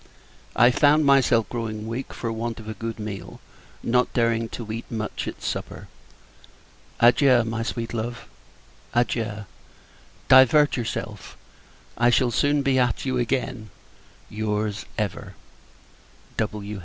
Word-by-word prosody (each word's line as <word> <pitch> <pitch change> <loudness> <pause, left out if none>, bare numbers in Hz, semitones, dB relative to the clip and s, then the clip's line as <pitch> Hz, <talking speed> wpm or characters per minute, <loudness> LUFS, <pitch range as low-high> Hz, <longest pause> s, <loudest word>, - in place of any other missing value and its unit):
I 120 +2 +6
found 150 +3 +4
myself 130 -6 +4
growing 110 -3 -4
weak, 120 +4 -5
for 115 - -4
want 115 +1 -4
of 110 - -11
a 110 - -4
good 115 +2 -5
meal, 105 -3 -7 0.4
not 125 +1 +2
daring 115 -1 +1
to 110 -2 -7
eat 115 +1 -6
much 110 -2 -4
at - - -7
supper. - - -5 1.1
Adieu, 125 +1 +5
my 115 0 -3
sweet 115 0 -4
love! 120 +1 -4 0.7
adieu. 115 -3 -1 0.8
Divert 130 +3 +6
yourself 120 -3 -5 0.6
I 120 0 +5
shall 120 0 +3
soon 145 +4 +2
be 135 -1 +2
at 125 0 0
you 130 -2 0
again. 125 -2 -2 0.6
Your's, 105 0 -3
ever, 105 -6 -4 1.0
W. 105 -1 -3
115 Hz, 125 wpm, -24 LUFS, 110-125 Hz, 1.1 s, I